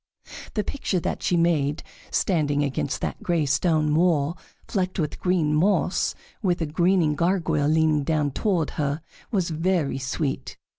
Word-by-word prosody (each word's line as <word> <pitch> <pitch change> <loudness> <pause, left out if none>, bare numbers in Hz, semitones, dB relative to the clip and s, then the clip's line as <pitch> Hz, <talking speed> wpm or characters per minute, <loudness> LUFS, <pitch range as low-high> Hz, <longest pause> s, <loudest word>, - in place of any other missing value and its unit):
The 210 - +1
picture 205 -8 -2
that - - -3
she 175 - +1
made, 160 -3 +1 0.3
standing 145 -5 +1
against 140 -1 -2
that - - -3
gray 170 -4 +1
stone 150 +2 +2
wall 165 -2 +2 0.3
flecked 185 -2 -1
with 155 -5 -2
green 175 -5 +1
moss, 180 +3 +2 0.3
with 180 -4 +1
a 165 - 0
grinning 170 0 +2
gargoyle 170 -2 +1
leaning 155 -1 +3
down 150 -1 0
toward 175 +1 0
her, 145 +2 -1 0.3
was 185 -6 0
very 165 -4 0
sweet. 135 +1 -3
160 Hz, 145 wpm, -25 LUFS, 145-180 Hz, 0.3 s, leaning